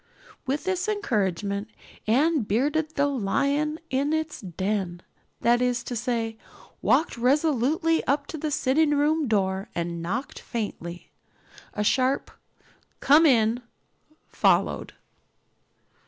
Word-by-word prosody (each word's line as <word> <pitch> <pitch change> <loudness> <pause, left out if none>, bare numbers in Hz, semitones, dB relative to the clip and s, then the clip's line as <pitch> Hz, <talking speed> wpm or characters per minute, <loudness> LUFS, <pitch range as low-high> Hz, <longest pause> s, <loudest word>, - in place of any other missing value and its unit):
With 280 +3 -1
this 370 0 -1
encouragement 205 - -1 0.4
Anne 290 +7 +3
bearded 290 +9 0
the 285 - +3
lion 280 +5 0
in 280 +3 +1
its 315 -3 -2
den 185 -1 -3 0.4
that 240 +1 +3
is 245 -1 0
to 245 - -5
say, 230 -1 -2 0.4
walked 315 -6 +2
resolutely 300 +5 +2
up 280 +1 +1
to - - -4
the 310 - -2
sitting 290 +2 +2
room 300 +1 +2
door 195 -3 0
and 170 0 -3
knocked 225 +11 -4
faintly. 180 -7 -6 0.6
A 210 - 0
sharp 260 +5 +1 0.7
"Come 310 +4 +6
in" 230 -2 +3 0.7
followed. - - +1
255 Hz, 110 wpm, -26 LUFS, 210-300 Hz, 0.7 s, Come